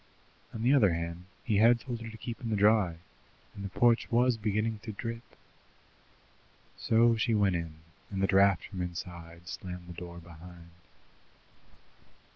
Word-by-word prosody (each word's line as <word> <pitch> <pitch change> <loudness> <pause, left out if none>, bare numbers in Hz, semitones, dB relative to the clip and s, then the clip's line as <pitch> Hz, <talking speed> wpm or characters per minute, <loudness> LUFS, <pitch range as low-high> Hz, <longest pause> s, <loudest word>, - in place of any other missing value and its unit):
On 110 - -5
the 130 +4 +4
other 105 -11 +4
hand, 85 +1 -5 0.2
he 105 -2 +1
had 115 +3 +5
told 120 -2 -6
her 115 - -6
to 110 - -10
keep 115 +1 -7
in 115 - -4
the 110 - +1
dry, 105 -4 +3 0.6
and 100 - -8
the 100 - -4
porch 120 +3 +3
was 125 +1 +3
beginning 110 0 -1
to 110 - -6
drip. 115 +2 -5 1.5
So 115 +1 +3
she 115 0 +1
went 100 -3 +3
in, 85 -2 -4 0.3
and 95 - -4
the 95 - +3
drought 100 0 +4
from 95 -3 -6
inside 85 -1 -7
slammed 90 -1 -7
the 85 - -9
door 85 0 -9
behind. 85 0 -13
100 Hz, 160 wpm, -30 LUFS, 90-115 Hz, 1.5 s, had